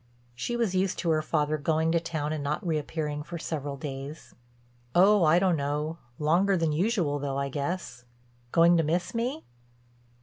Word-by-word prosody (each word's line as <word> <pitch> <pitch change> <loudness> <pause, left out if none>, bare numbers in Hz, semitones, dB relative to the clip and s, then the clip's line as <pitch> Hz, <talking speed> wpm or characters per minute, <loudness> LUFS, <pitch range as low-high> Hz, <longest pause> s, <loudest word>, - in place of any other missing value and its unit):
She 125 - -3
was 230 -6 0
used 185 0 +1
to 170 - 0
her 155 -1 +2
father 155 -1 0
going 160 +2 +1
to 170 - +3
town 155 -3 -3
and 150 -2 -3
not 150 +7 -2
reappearing 150 -2 -2
for 170 +3 -6
several 145 -3 -4
days. 140 +2 -7 0.6
"Oh, 195 +2 +6
I 160 +1 +5
don't 180 -1 +3
know; 150 +3 -2 0.2
longer 180 +6 +3
than 165 -2 +1
usual, 170 -3 +1
though, 140 -1 -3
I 140 0 -1
guess. 140 -3 -4 0.5
Going 170 +1 +5
to 165 - +3
miss 175 +3 -1
me?" 250 +7 -2
160 Hz, 170 wpm, -28 LUFS, 145-175 Hz, 0.6 s, Oh